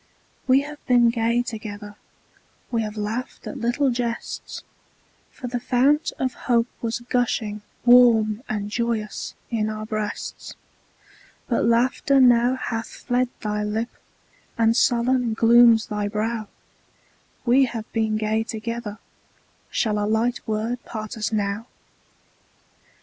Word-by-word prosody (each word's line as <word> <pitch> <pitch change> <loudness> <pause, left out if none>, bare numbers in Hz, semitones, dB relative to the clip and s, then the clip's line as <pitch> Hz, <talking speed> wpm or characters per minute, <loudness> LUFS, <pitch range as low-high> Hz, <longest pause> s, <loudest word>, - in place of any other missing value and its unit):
We 265 +1 +5
have 295 +1 -9
been 240 -2 +5
gay 235 +1 +1
together; 210 -3 -7 0.8
We 230 -2 +1
have 215 0 -5
laughed 220 +4 -4
at - - -6
little 250 +4 +1
jests; 235 -1 -4 0.7
For - - -10
the 245 0 -2
fount 270 +5 +2
of 260 -2 -1 0.2
hope 235 -1 +4 0.2
was 235 +1 -2
gushing 235 -4 -1 0.2
Warm 235 -3 +6
and 210 -1 -3
joyous 230 -2 -2 0.2
in 215 -2 0
our 215 0 -5
breasts, 215 -1 -5 0.9
But 235 - +1
laughter 250 +4 +3
now 245 0 +5
hath 225 -3 -3
fled 245 0 -1
thy 210 0 -2
lip, 220 +3 -2 0.7
And 225 0 +3
sullen 245 -1 +2
glooms 230 0 +6
thy 210 -2 -2
brow; 215 +1 -2 1.0
We 260 +2 +5
have 230 -3 -5
been 220 -1 +1
gay 215 +1 0
together, 225 -1 -5 0.7
Shall 210 -3 0
a - - 0
light 230 +3 +1
word 225 +3 -2
part 215 -2 -6
us 215 -1 -2
now? 210 +1 -2
230 Hz, 125 wpm, -23 LUFS, 215-245 Hz, 1.0 s, Warm